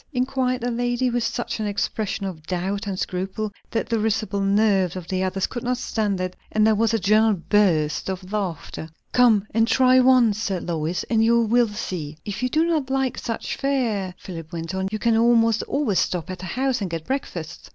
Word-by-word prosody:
_" - - -32
enquired 255 0 0
the 245 +1 -1
lady, 245 +1 0
with 240 -1 0
such 240 -1 -3
an 215 - -1
expression 205 0 -2
of 180 -5 -5
doubt 195 +3 -2
and 195 -2 -3
scruple 190 +4 -3 0.2
that 225 - -2
the 230 -1 +1
risible 215 -2 0
nerves 195 -3 +2
of 180 -2 -6
the 185 -1 -1
others 190 0 0
could 240 - -5
not 250 +1 -1
stand 210 -5 -1
it, 185 0 -3 0.2
and 215 0 +3
there 220 - +5
was 220 +1 +2
a 225 - +2
general 215 +2 +3
burst 170 -7 +2
of 185 0 -5
laughter. 170 -5 -4 0.2
"Come 230 -5 +4
and 225 +1 +3
try 255 +1 +5
once," 250 -5 +4
said 195 -5 -2
Lois, 165 +1 -1
"and 225 -1 +1
you 235 +1 +4
will 235 +2 +3
see." 180 -8 -5
"If 205 +2 -4
you 255 - 0
do 315 +5 +2
not 310 -6 0
like 265 -2 0
such 230 -1 -4
fare," 225 -10 -1
Philip 165 -4 -9
went 165 +1 -5
on, 190 0 -1
"you 215 - -1
can 230 +1 +2
almost 230 -1 +4
always 275 -10 +1
stop 180 -1 -1
at 185 -1 -7
a - - -6
house 255 +5 -1
and 195 - -2
get 165 -1 -5
breakfast." 175 - -5
215 Hz, 210 wpm, -23 LUFS, 185-240 Hz, 0.2 s, there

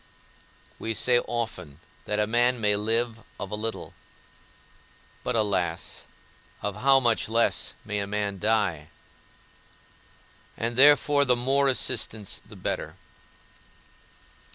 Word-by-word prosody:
We 115 0 -3
say 120 +3 +4
often 90 -12 -5 0.3
that 105 - -2
a 105 - +2
man 120 +3 +2
may 105 -2 +3
live 115 +2 0 0.2
of 100 - -6
a - - -1
little; 110 +1 -5 1.3
but, - - -2
alas, 95 -6 -1 0.6
of 100 -1 -3
how 135 +1 +5
much 120 -4 +1
less 115 +1 +1
may 105 -1 -2
a 100 - -3
man 100 -1 -3
die? 105 -8 0 1.7
And 115 +1 -2
therefore 145 +1 +5
the 125 -3 +3
more 135 +3 +1
assistants 110 -2 0
the - - -14
better. - - -4
110 Hz, 115 wpm, -26 LUFS, 105-120 Hz, 1.7 s, how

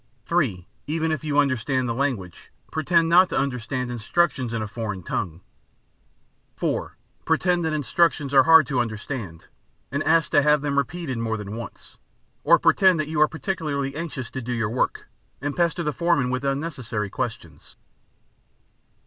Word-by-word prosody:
(3) 120 - 0 0.2
Even 160 +1 -1
if 155 -1 -2
you 150 -2 -1
understand 130 -2 +1
the 115 - -1
language, 115 -10 -3 0.2
pretend 165 +1 +2
not 180 +2 +6
to - - -2
understand 125 -1 -2
instructions 125 +2 0
in 115 -2 -2
a - - -4
foreign 105 -4 -5
tongue. 85 -1 -3 1.2
(4) - - -2 0.3
Pretend 175 +2 +1
that 160 - 0
instructions 150 -1 +1
are 135 - +8
hard 160 +1 +7
to 130 -2 -1
understand, 110 - -4 0.5
and 140 +2 -1
ask 165 0 +2
to - - +5
have 150 0 +3
them 140 -1 +1
repeated 140 -2 -3
more 110 -1 -1
than 105 0 -6
once. 115 0 -10 0.4
Or - - +6
pretend 185 -4 +4
that 155 0 -2
you 155 -1 0
are 155 - +7
particularly 150 -5 -3
anxious 150 -7 -5
to 130 - -5
do 125 +1 -4
your 110 -3 -1
work, 125 - -1 0.3
and 145 +1 -3
pester 170 0 +1
the 150 -2 -1
foreman 170 -7 +1
with 130 +1 -2
unnecessary 135 - -3
questions. 125 -1 -6
140 Hz, 160 wpm, -24 LUFS, 115-160 Hz, 1.2 s, are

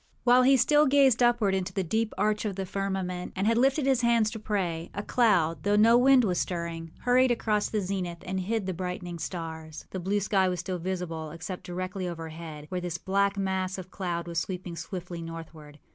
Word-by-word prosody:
While 250 +1 +6
he 265 +1 +5
still 295 +4 +4
gazed 265 -3 +4
upward 240 -5 +3
into 190 0 -2
the 190 - -1
deep 220 +6 0
arch 210 +2 +1
of 205 -3 -2
the 195 0 -3
firmament 190 -2 -3
and 195 +1 -1
had 230 +1 +3
lifted 270 +4 +3
his 265 -2 +3
hands 235 -2 +3
to 220 - -6
pray, 180 -6 -2
a 205 - -3
cloud, 175 - +2
though 205 +4 +2
no 225 +3 +6
wind 255 +1 +6
was 185 -5 +1
stirring, 170 -2 -3
hurried 250 +1 +4
across 215 -3 +1
the 215 - -1
zenith 185 -3 -3
and 190 +1 -2
hid 210 +2 -1
the 185 - -2
brightening 180 -1 -5
stars. 160 -3 -6
The 190 - -4
blue 195 +3 0
sky 195 -1 +2
was 180 -1 -2
still 180 +1 -3
visible, 170 -3 -4
except 165 +4 -7
directly 185 +1 -4
overhead, 160 -2 -7
where 180 -1 -3
this 175 -1 -3
black 200 +2 +1
mass 190 -1 -1
of 185 0 -8
cloud 175 -3 -3
was 170 -1 -1
sweeping 180 -1 -5
swiftly 175 +1 -6
northward. 165 -3 -9
190 Hz, 205 wpm, -28 LUFS, 170-215 Hz, -, While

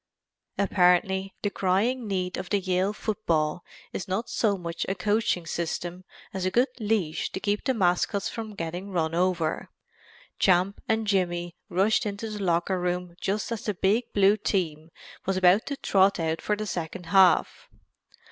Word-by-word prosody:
Apparently 190 0 +2
the 205 - 0
crying 215 +7 0
need 185 -2 -2
of 185 - -6
Yale 190 -1 +1
football 175 -7 -1 0.3
is 190 - -4
not 195 +5 -2
so 205 -3 +1
much 170 -2 -4
a 195 - 0
coaching 205 -2 0
system 175 +2 -4 0.3
as 190 -1 -3
a 185 - +2
good 245 +7 +2
leash 205 -8 -1
to - - -4
keep 205 +1 -1
the 265 - +1
mascots 195 +1 +1
from 220 -2 -6
getting 175 +3 -5
run 165 -4 -1
over. 175 -2 0 0.7
Champ 185 +1 +3
and 220 0 +1
Jimmy 175 -4 0
rushed 210 +5 +2
into 205 +2 -4
the 210 -1 -5
locker 180 +1 +1
room 180 0 -2
just 210 +4 -1
as 230 - -4
the 210 - -1
big 210 +7 +1
Blue 200 +1 +4
team 165 -6 -2 0.4
was 190 -1 +1
about 185 +3 +4
to 280 - -3
trot 195 -4 +3
out 160 0 -1
for 210 - 0
the 215 +1 -4
second 175 -1 -5
half. 190 -2 +4
190 Hz, 160 wpm, -26 LUFS, 175-205 Hz, 0.7 s, Blue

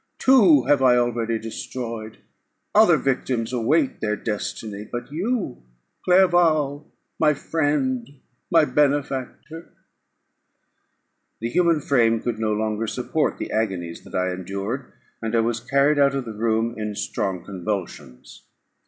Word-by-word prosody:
Two 195 - +5
I - - -6
have 145 -2 +4
already 120 -2 +2
destroyed; 115 0 -6 0.6
other - - +6
victims 125 -3 -1
await 135 +5 +1
their 105 -1 0
destiny: 105 -1 -5
but 120 +2 -6
you, 185 - -2 0.4
Clerval, 165 -6 +3 0.3
my 150 -1 +3
friend, 165 - -1 0.4
my 165 -2 +5
benefactor 145 +2 -1 0.9
" - - -50
The 115 +1 -3
human 170 0 +2
frame 115 -5 +2
could 115 -1 -3
no 110 -1 0
longer 110 +1 -1
support - - -1
the - - -5
agonies 95 -6 -2
that - - -11
I 90 0 0
endured, 100 +8 -5 0.3
and 115 0 -2
I 115 - +4
was 115 0 -1
carried 140 +3 +2
out 140 -1 +4
of 135 -2 -2
the 110 - -6
room 115 +1 0
in 105 -1 -4
strong 95 -3 -3
convulsions. 95 -9 -6
120 Hz, 130 wpm, -23 LUFS, 110-145 Hz, 0.9 s, other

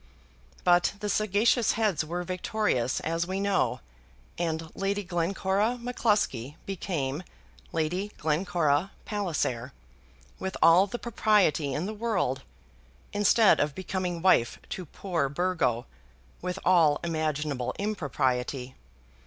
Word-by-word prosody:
But 175 0 +4
the 210 0 -3
sagacious 215 +3 +3
heads 210 -8 +1
were 175 +3 -3
victorious, 185 - -1
as 165 +1 -1
we 190 +1 -2
know, 195 - +1 0.5
and 160 -1 -3
Lady 200 +1 -1
Glencora 190 +5 0
M'Cluskie 205 - 0
became 165 -7 -3 0.5
Lady 180 +6 -1
Glencora 160 +1 +1 0.2
Palliser 155 - -2 0.7
with 190 0 -4
all 180 +4 +6
the 225 - -4
propriety 205 - +2
in 155 - -1
the 215 - -3
world, 205 - -1 0.7
instead 205 +1 +5
of 145 -1 0
becoming 180 -2 -3
wife 120 -11 +4
to 180 -3 -5
poor 165 -5 -2
Burgo, 140 -7 0 0.6
with 180 +1 -3
all 165 -5 +5
imaginable 150 -5 -1
impropriety. 135 - -1
175 Hz, 110 wpm, -28 LUFS, 150-200 Hz, 0.7 s, all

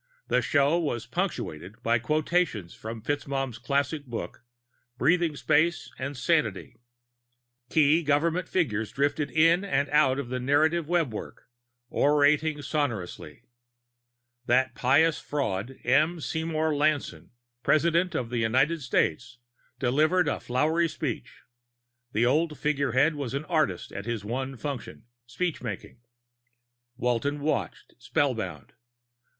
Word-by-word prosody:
The - - +3
show 145 +3 +2
was 120 -9 -2
punctuated 90 +10 -4
by 115 0 +2
quotations 155 - 0
from 110 0 -8
FitzMaugham's 135 -3 -2
classic 140 +2 -1
book, 120 0 -6 0.5
Breathing 165 +3 +2
Space 155 +4 +1
and 140 +1 -4
Sanity. 120 - 0 0.9
Key 155 +3 +4
government 165 +4 +1
figures 110 - 0
drifted 145 +1 0
in 165 +4 +4
and 145 -8 0
out 135 -3 +3
of 140 -4 -4
the 125 0 -2
narrative 150 +5 +2
webwork, 165 -10 -2 0.4
orating 150 +1 +3
sonorously. 130 - -3 1.0
That 130 +2 +3
pious 150 +5 +3
fraud, 130 -4 -3
M. 155 +7 +3
Seymour 160 0 -1
Lanson, 150 0 0 0.3
President 165 +5 +2
of 120 -4 -2
the 120 - -1
United 130 +9 +2
States, 125 -1 0 0.4
delivered 155 +8 +2
a - - -1
flowery 160 +7 +1
speech; 145 -6 -5 0.7
the 115 +2 +2
old 150 +4 +1
figurehead 140 0 +2
was 140 -4 -4
an 140 +2 -3
artist 155 - 0
at 100 +3 -7
his 115 -3 -3
one 130 +4 -3
function, 140 -3 -6 0.2
speechmaking. 120 - -4 1.0
Walton 125 +4 0
watched, 150 +2 -3
spellbound. 110 - -2
145 Hz, 115 wpm, -27 LUFS, 120-155 Hz, 1.0 s, Key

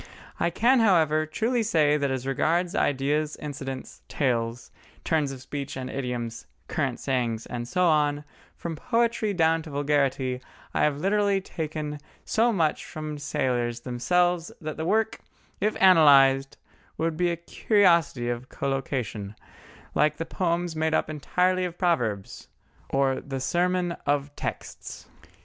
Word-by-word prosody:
I 170 - +2
can, 240 +9 +3
however, 160 -7 +3
truly 230 +10 0
say 155 -9 +3
that 140 -2 0
as 130 -1 -3
regards 165 +6 +1
ideas, 145 +2 0
incidents, 135 -3 -7
tales, 120 -3 -1 0.3
turns 155 -4 +1
of 130 -1 -9
speech 140 -1 -5
and 130 0 -5
idioms, 120 -3 -4 0.2
current 135 -7 -2
sayings, 120 -4 -1
and 120 -1 -5
so 180 +6 +1
on, 150 -3 +2 0.3
from 170 -1 -5
poetry 230 +4 0
down 165 -3 +2
to 160 - -10
vulgarity, 140 -3 0 0.3
I - - +1
have 150 -2 0
literally 200 +3 +2
taken 155 -4 -5 0.3
so 230 +2 +2
much 165 -8 +1
from 155 -2 -6
sailors 125 -5 -1
themselves 175 +8 +1
that 155 -2 -5
the 160 - -4
work, 220 +4 +1 0.4
if 210 +2 0
analysed, 140 -7 +6 0.4
would 165 0 -1
be 175 +2 +1
a 170 - 0
curiosity 170 - +2
of 120 +1 -3
collocation, 125 -7 -3 0.6
like 150 0 +2
the 165 - -3
poems 170 -1 -1
made 160 0 +1
up - - 0
entirely 180 +5 +1
of 175 -1 -4
proverbs, 120 - -1 0.4
or 135 -1 +1
the 135 -2 -5
Sermon 175 +4 +1 0.2
of 145 0 0
Texts. - - -6
150 Hz, 140 wpm, -26 LUFS, 135-175 Hz, 0.6 s, analysed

